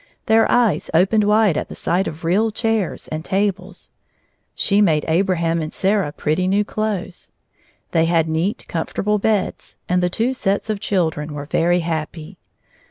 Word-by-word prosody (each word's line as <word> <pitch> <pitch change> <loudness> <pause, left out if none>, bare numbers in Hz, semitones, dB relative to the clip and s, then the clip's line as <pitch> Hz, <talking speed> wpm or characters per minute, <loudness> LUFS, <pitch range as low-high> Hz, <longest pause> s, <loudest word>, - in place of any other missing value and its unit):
Their 225 0 +4
eyes 225 -11 +2
opened 200 +5 +3
wide 210 -5 +3
at - - -6
the - - -8
sight 185 +3 0
of 155 +2 -7
real 195 +7 +2
chairs 220 -2 -2
and 155 0 -4
tables. 195 -1 -2 0.6
She 205 0 +2
made 155 -7 +2
Abraham 170 -1 +1
and 155 0 -4
Sarah 195 -5 0
pretty 155 +5 -1
new 200 +2 +2
clothes. 205 -4 -4 0.6
They 165 -1 +3
had 165 -1 +2
neat, 160 +6 -1
comfortable 205 +5 -1
beds, 210 -2 -1
and 180 0 +1
the 180 - +1
two 230 +8 0
sets 205 -3 -1
of 210 - -3
children 160 -7 -1
were 145 0 -5
very 175 +4 +1
happy. 160 +1 -5
185 Hz, 160 wpm, -20 LUFS, 165-210 Hz, 0.6 s, Their